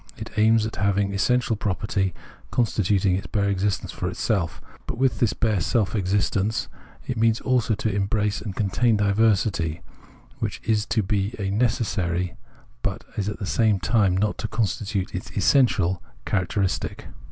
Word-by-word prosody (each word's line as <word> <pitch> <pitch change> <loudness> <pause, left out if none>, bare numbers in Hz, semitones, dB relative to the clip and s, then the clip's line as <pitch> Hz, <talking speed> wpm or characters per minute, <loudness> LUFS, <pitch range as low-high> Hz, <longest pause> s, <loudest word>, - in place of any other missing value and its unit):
It - - -7
aims 110 0 +4
at 110 - -5
having 100 0 +1
an - - -5
essential 120 +4 +2
property, 100 -2 -1 0.4
con 120 - +2
stituting 100 -3 +1
its 95 - -4
bare 100 -1 0
existence 100 +1 -1
for - - -3
itself, 85 -6 -1 0.3
but - - -4
with 130 0 +1
this 110 -7 +2
bare 105 -3 +1
self 105 -1 +1
existence 100 +2 0 0.4
it 125 - -3
means 115 0 +3
also 125 -3 +1
to 105 0 -1
embrace 105 +1 0
and 100 -3 -6
contain 110 +2 +2
diversity, 100 -5 +1 0.6
which - - -3
is 110 -1 +1
to 110 -2 +1
be 100 +2 -1 0.2
necessary, 95 -6 0 0.5
but - - -2
is 105 -1 -1
at 105 - -5
the 105 - -5
same 105 0 +2
time 95 -1 +2
not 105 +2 0
to 110 - -2
constitute 105 -3 -2
its 90 - -5
essential 100 -7 +3 0.2
characteristic. 95 0 -1
105 Hz, 155 wpm, -24 LUFS, 95-110 Hz, 0.6 s, aims